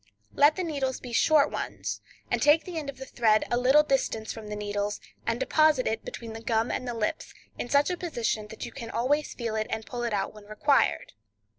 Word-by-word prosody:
Let 295 +2 +5
the 370 - -2
needles 280 -6 -2
be 245 -2 -8
short 300 +4 +4
ones, - - -4 0.3
and - - +1
take 295 +2 +5
the 350 -3 -4
end 290 -3 -6
of 280 - -7
the 265 - -7
thread 220 -4 +2
a - - +3
little 265 +4 +5
distance 265 -6 -1
from 220 -2 -9
the 210 - -4
needles, 205 0 -2 0.3
and 230 +1 0
deposit 310 -2 +3
it 220 - -1
between 230 -2 -7
the 225 - -7
gum 225 0 0
and 255 - -3
the 240 - -3
lips 215 -2 -3 0.2
in 240 - -3
such 285 +5 +3
a 360 - -2
position 235 - -2
that 220 - -7
you - - -8
can 235 -4 -7
always 285 +6 0
feel 230 -3 -3
it 215 0 -1
and 220 0 -3
pull 245 -1 -5
it 235 -1 -1
out 205 0 -1
when 210 -1 -13
required. 215 +7 +1
240 Hz, 230 wpm, -27 LUFS, 220-290 Hz, 0.3 s, Let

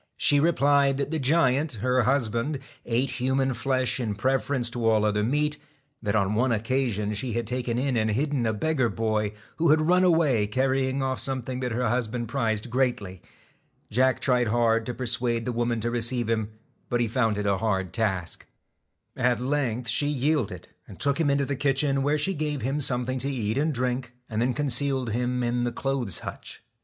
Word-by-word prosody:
he 145 - +4
replied 140 -3 +3
that 140 +1 -2
the 160 - -1
giant, 140 0 +2
her 125 +3 +1
husband, 125 +2 0 0.3
ate 125 +3 0
human 130 +1 +1
flesh 130 +1 -1
in 110 -4 -2
preference 130 +2 0
to 115 -1 0
all 110 -1 +3
other 105 0 +1
meat; 150 +6 0 0.4
that 105 -1 -1
on 100 -1 +1
one 125 +4 +1
occasion 110 -2 0
she 115 +3 -2
had 120 0 -1
taken 125 0 -2
in 130 0 0
and 110 -1 +1
hidden 130 +1 0
a - - +2
beggar 130 +2 0
boy, 110 -2 -1 0.3
who 165 0 +2
had 155 +1 +5
run 180 +4 +3
away 155 - +3
carrying 130 +3 0
off 130 -1 -1
something 130 -1 -3
that 125 -1 -2
her 125 +2 0
husband 120 0 -1
prized 110 0 -1
greatly. 120 -8 -1 0.7
Jack 130 +3 +2
tried 125 -3 +2
hard 115 0 +2
to 125 - -2
persuade 120 -2 0
the 125 - -1
woman 120 -1 -1
to 120 +2 -2
receive 120 0 0
him, 110 -2 0 0.4
but 120 - 0
he 120 - +1
found 110 -2 0
it 105 - -2
a 100 -1 +2
hard 95 -5 -1
task. 95 -6 -2 0.7
At 125 -2 +1
length 125 -3 -1
she 130 +6 +2
yielded, 135 - -1 0.2
and 95 - -12
took 140 +2 +2
him 160 -3 +2
into 140 0 +2
the 140 - -2
kitchen, 140 0 +1
where 145 +2 +1
she 170 +6 0
gave 150 - -3
him 135 +4 -1
something 130 -1 0
to 135 +3 -1
eat 110 -5 -2
and 155 +3 +1
drink, 125 -1 -2
and 110 -1 -2
then 125 0 +1
concealed 135 -3 +1
him 125 +2 -1
in 120 0 0
the 120 - -1
clothes 125 - -1
hutch. - - -7
125 Hz, 190 wpm, -26 LUFS, 115-135 Hz, 0.7 s, had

